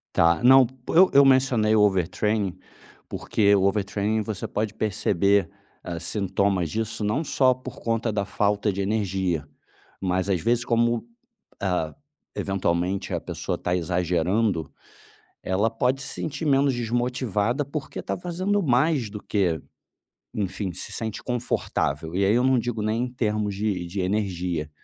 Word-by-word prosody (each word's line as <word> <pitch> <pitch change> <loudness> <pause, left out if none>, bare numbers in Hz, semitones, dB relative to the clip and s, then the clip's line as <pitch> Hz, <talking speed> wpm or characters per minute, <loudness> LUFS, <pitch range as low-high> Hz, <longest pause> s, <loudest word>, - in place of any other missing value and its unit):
Tá, 85 +4 +4
não, 130 0 +8 0.2
eu 185 +3 +6
eu 140 0 +8
mencionei 130 -5 +4
o 110 - +4
overtraining 100 0 +1 0.5
porque 100 -1 +2
o 95 - +3
overtraining 100 +2 0
você 110 +1 -4
pode 105 0 -3
perceber, 100 -3 +1 0.3
ah, 85 -2 -5
sintomas 100 -2 0
disso, 110 +1 -3
não 110 +10 0
só 130 -2 +3
por 130 - -10
conta 115 -1 -1
da 100 -1 -1
falta 105 +1 +1
de 100 +1 -2
energia, 95 -7 -1 0.5
mas 95 0 0
às 95 - +2
vezes, 120 +1 +1
como, 120 -1 +1 0.6
ah, 90 -5 -1 0.4
eventualmente 95 0 -1
a - - 0
pessoa - - -4
está 90 - -1
exagerando, 90 +1 0 0.7
ela 100 +4 +1
pode 125 +4 0
se - - -5
sentir 155 +1 -3
menos 135 -1 +3
desmotivada, 120 0 -1
porque 140 +1 -6
está - - -3
fazendo 185 +3 -1
mais 130 -3 +2
do 105 0 -8
que, 90 -7 0 0.7
enfim, 100 -1 -3
se - - -5
sente 110 -2 -4
confortável. 80 - -2
E 95 +1 +2
aí 100 +3 +3
eu 125 - +3
não 130 -1 +4
digo 115 -2 -2
nem 110 +3 0
em 125 - -6
termos 105 -4 -1
de 100 -3 -2
de 95 +3 -4
energia. 90 -5 -2
105 Hz, 145 wpm, -25 LUFS, 95-120 Hz, 0.7 s, não